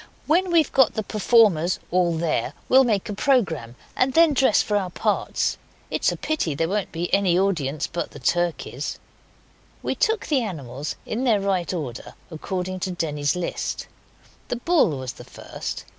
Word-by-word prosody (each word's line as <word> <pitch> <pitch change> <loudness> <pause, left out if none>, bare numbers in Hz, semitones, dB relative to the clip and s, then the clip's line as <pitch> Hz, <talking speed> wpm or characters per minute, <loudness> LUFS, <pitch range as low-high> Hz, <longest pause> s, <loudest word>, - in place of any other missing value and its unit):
When 360 +4 +2
we've 330 -3 +3
got 265 -3 +4
the 220 - -1
performers 205 -5 +3
all 175 -2 +2
there 155 -6 -1
we'll 265 +1 +6
make 215 -5 0
a 210 - -4
programme, 170 - +1 0.2
and 260 +1 +1
then 330 -2 +6
dress 265 -5 +4
for 210 - -1
our 195 -3 0
parts. - - -1 0.3
It's - - +1
a - - -5
pity 295 - -1
there 165 +3 0
won't 200 +1 -2
be 170 +1 -4
any 190 -3 +3
audience 155 -7 0
but 170 - -4
the - - -12
turkeys.' 170 -5 -1 0.9
We - - 0
took 445 0 0
the 285 -4 +1
animals 145 - -5
in 240 +4 -3
their 225 -5 +3
right 195 -3 0
order, 140 -10 -5 0.2
according 185 +3 -4
to 185 - -2
Denny's 150 -4 -1
list. 180 -1 -3 0.6
The - - -2
bull 245 - +2
was 130 -2 -5
the - - -12
first. - - -7
185 Hz, 170 wpm, -23 LUFS, 160-235 Hz, 0.9 s, we'll